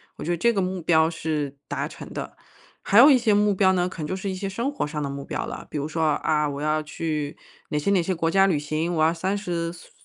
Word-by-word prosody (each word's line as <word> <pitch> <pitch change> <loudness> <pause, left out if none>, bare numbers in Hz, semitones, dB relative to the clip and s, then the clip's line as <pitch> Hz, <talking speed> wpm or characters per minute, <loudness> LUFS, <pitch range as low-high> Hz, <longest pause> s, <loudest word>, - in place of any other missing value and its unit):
我 - - -8
觉 170 - -1
得 175 - 0
这 235 +7 +3
个 195 - +1
目 185 0 -2
标 160 -1 +4
是 155 -4 -3
达 - - -3
成 - - -10
的。 - - -6 0.5
还 200 - +3
有 275 +5 +9
一 275 - +7
些 230 -4 +2
目 205 0 +3
标 190 0 +4
呢， 180 -1 +1
可 185 - -9
能 - - -3
就 185 - -3
是 190 +1 -3
一 190 - -3
些 195 +1 -4
生 235 +7 -2
活 285 - -2
上 150 +1 -4
的 140 - -2
目 140 0 -5
标 - - -4
了。 - - -7
比 - - -3
如 145 +1 -2
说： 160 +1 -2 0.2
“啊， 150 -1 +1
我 140 0 -5
要 155 +1 0
去 150 -1 -3 0.3
哪 150 - 0
些 150 - -1
哪 185 -3 +3
些 185 - -1
国 165 -1 0
家 195 +3 +4
旅 175 -6 +2
行， 155 +3 -2
我 160 - 0
要 165 - +3
30 175 -1 -2
岁 175 0 -14
岁- - - -29
170 Hz, 300 characters per minute, -24 LUFS, 155-195 Hz, 0.5 s, 有